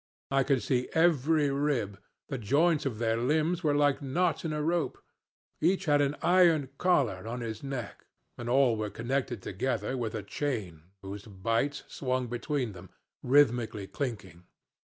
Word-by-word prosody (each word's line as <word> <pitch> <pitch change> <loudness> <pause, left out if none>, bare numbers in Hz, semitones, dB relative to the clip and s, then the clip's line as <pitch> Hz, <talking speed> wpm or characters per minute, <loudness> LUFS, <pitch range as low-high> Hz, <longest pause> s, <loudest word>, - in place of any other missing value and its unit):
I 135 0 +3
could 135 -3 +1
see 125 +2 0
every 155 -3 +3
rib, 135 -9 -1 0.3
the 135 - -4
joints 150 +6 +2
of 120 -5 -4
their 115 0 +1
limbs 155 +8 +1
were 150 -2 +2
like 145 -1 +2
knots 165 +5 0
in 160 - -2
a 150 - -2
rope; 170 0 0 0.6
each 185 +4 +2
had 145 -2 +4
an 145 0 +1
iron 170 -6 +4
collar 125 - +1
on 120 +2 -4
his 110 -2 -5
neck, 135 -6 -6 0.3
and 120 0 -6
all 130 -2 +4
were 105 -1 -2
connected 120 0 -2
together 130 +6 -2
with 115 -4 -3
a 105 - -4
chain 100 - -4 0.2
whose 100 +1 -7
bights 115 +8 -1
swung 130 -1 -2
between 125 +1 -2
them, 95 -1 -12 0.3
rhythmically 120 -6 +3
clinking. 95 - -5
130 Hz, 155 wpm, -29 LUFS, 115-145 Hz, 0.6 s, had